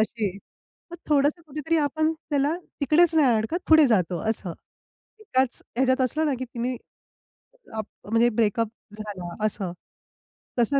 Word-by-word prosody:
अशी 220 -2 0 0.6
मग 345 - -7
थोडंसं 295 +3 +2
कुठेतरी 305 +3 -1
आपण 310 +2 +1 0.2
त्याला 290 +3 +2 0.2
तिकडेच 320 +4 +4
नाही 265 -7 +5
अडकत 220 +11 -1
पुढे 315 -2 +8
जातो 180 -6 +2
असं. 195 -5 -3 0.7
एकाच 260 - 0
ह्याच्यात 260 +1 +3
असलं 305 +5 +1
ना, 280 - +1
की 260 - -3
तिने 245 0 -3 1.0
अप 215 - -2 0.3
म्हणजे 230 +1 +4
ब्रेकअप 225 0 +1 0.3
झाला 190 -5 -6
असं. 190 -4 -2 0.9
तसं 275 +4 +3
260 Hz, 135 wpm, -25 LUFS, 220-300 Hz, 1.0 s, पुढे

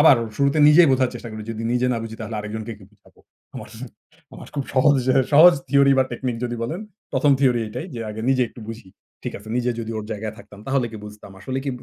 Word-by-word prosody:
আবার 145 -4 +7 0.2
শুরুতে 140 +2 +2
নিজেই 160 +1 +7
বোঝার 130 -1 +2
চেষ্টা 120 - -7
করি। 110 - -7
যদি 115 0 -5
নিজে 125 +1 +1
না 120 - -1
বুঝি 110 0 -7
তাহলে 110 0 -5
আরেকজনকে 110 +2 -6
কি 95 - -15
বুঝাব? - - -25 0.4
আমার, - - -8 0.7
আমার - - -11
খুব 140 -2 -2
সহজ 140 +2 +5 0.2
এ - - +1 0.2
সহজ 170 +4 +8
থিওরি 140 0 +5
বা 130 - +4
টেকনিক 120 -1 -3
যদি 120 0 -3
বলেন, 160 - -3 0.3
১ম, 140 +1 +3
থিওরি 125 -4 +3
এটাই 155 +11 -6
যে, 115 - -5
আগে 110 +1 -6
নিজে 130 -1 +3
একটু - - -14
বুঝি। 115 -4 -8 0.4
ঠিক - - -3
আছে। 105 +2 -14
নিজে 125 0 0
যদি 115 - -5
ওর 105 - -5
জায়গায় 110 0 -5
থাকতাম 105 -2 -14
তাহলে 135 -3 +1
কি - - -7
বুঝতাম। 105 -1 -11
আসলে 130 +5 -3
কি 140 - -1
বু 125 - -14
125 Hz, 235 wpm, -22 LUFS, 110-140 Hz, 0.7 s, সহজ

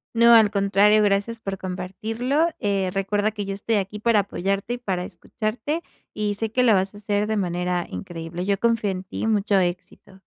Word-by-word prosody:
No, 235 +1 +7
al 220 -2 +7
contrario, 200 +1 +4
gracias 205 +3 0
por 195 -3 -5
compartirlo. 220 - -1
Eh, 195 -2 0
recuerda 205 +2 0
que 205 -2 -5
yo 195 - -3
estoy 210 +3 -1
aquí 205 +1 -2
para 225 -1 +3
apoyarte 195 +4 -2
y - - -3
para 190 -7 -2
escucharte, 215 - -4 0.3
y 210 -1 -1
sé 220 +2 -3
que 250 +2 +2
lo 230 -3 +5
vas 190 +1 0
a - - -10
hacer 205 0 -1
de 220 -1 0
manera 180 -1 -1
increíble. 165 - -6
Yo 200 -1 0
confío 230 -3 +1
en 185 -1 -3
ti, 190 - -4
mucho 205 -2 +2
éxito. 180 +2 -4
205 Hz, 190 wpm, -23 LUFS, 190-220 Hz, 0.3 s, No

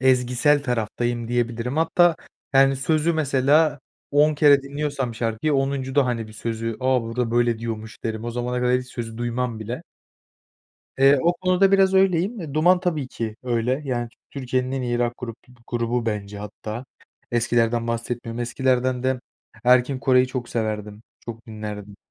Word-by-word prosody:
ezgisel 130 +3 +3
taraftayım, 120 -1 -2
diyebilirim. 120 +2 -1
Hatta, 165 +1 +4 0.4
yani, 135 0 +5
sözü 155 +4 +1
mesela 145 0 +2 0.3
10 150 +2 +4
kere 145 -2 +5
dinliyorsam 140 -3 -3
şarkıyı, 115 +6 -1
10'uncuda 135 0 +1
hani, 115 -3 -2
bir - - -12
sözü, 115 0 -4
"A, 130 -1 +2
burada, 115 +1 -2
böyle, 120 -1 +2
diyormuş." 110 -1 -6
derim. 110 0 -3
O 120 - -3
zamana 125 +1 -2
kadar 125 +1 +2
hiç 125 - -10
sözü 115 -2 -6
duymam 120 -1 -2
bile. 115 +3 -5 1.2
Eee, 135 +1 +6
o 170 - +4
konuda 185 +2 +2
biraz 195 -1 +4
öyleyim. 190 +3 +2
Eee, 155 -5 -7
Duman 175 +4 +4
tabii 155 -7 -1
ki 110 -3 -5
öyle. 125 +3 0
Yani, 120 -3 -2 0.2
Türkiye'nin 130 -1 -2
en 135 -1 -2
iyi 120 -1 -1
rock 120 0 0
grup 115 -2 -6 0.3
grubu 120 0 -1
bence 105 -1 -3
hatta. 105 +3 -7 0.5
Eskilerden 120 0 +1
bahsetmiyorum. 115 0 -3
Eskilerden 125 +1 0
de 130 -1 0 0.4
Erkin 125 +2 +4
Koray'ı 130 -1 +4
çok 130 -2 -5
severdim, 105 -2 -3 0.2
çok 115 -1 -9
dinlerdim. 105 -2 -7
125 Hz, 150 wpm, -23 LUFS, 115-140 Hz, 1.2 s, Eee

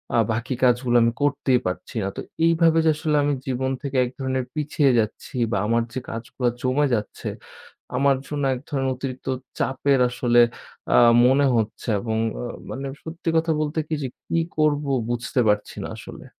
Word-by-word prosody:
আ - - +4
বাকি 120 +3 -2
কাজগুলো 125 0 +3
আমি 115 - +3
করতেই 140 -3 +2
পারছি 90 - -5
না। - - -1
তো - - -3 0.2
এইভাবে 165 0 +4
যে - - +5
আসলে 155 -1 -1
আমি 145 - +1
জীবন 130 0 -1
থেকে 140 -2 -3
এক - - -4
ধরনের 130 -1 -1
পিছিয়ে 150 -2 +2
যাচ্ছি 110 +3 -3 0.2
বা 100 - +1
আমার 115 +1 +2
যে 130 - -2
কাজগুলা 120 +2 -2
জমে 130 +3 +2
যাচ্ছে 105 -1 -4 0.7
আমার 140 0 +3
জন্য 145 -1 -3
এক 125 - -5
ধরনের 135 -2 0
অতিরিক্ত 130 0 -6 0.3
চাপের 135 +1 +1
আসলে 120 -1 +3 0.5
আ - - +7 0.3
মনে 135 +2 +4
হচ্ছে 110 +2 -2
এবং 110 +1 -2 0.2
অ - - -4 0.3
মানে 135 +1 -4 0.2
সত্যি 165 +1 -4
কথা 160 0 +1
বলতে 155 +1 -1
কি - - -4
যে - - -1 0.2
কি 165 - +1 0.2
করব 150 -1 +2 0.3
বুঝতে 120 +2 -1
পারছি 105 0 0
না - - -4
আসলে। - - -10
130 Hz, 175 wpm, -23 LUFS, 120-145 Hz, 0.7 s, আ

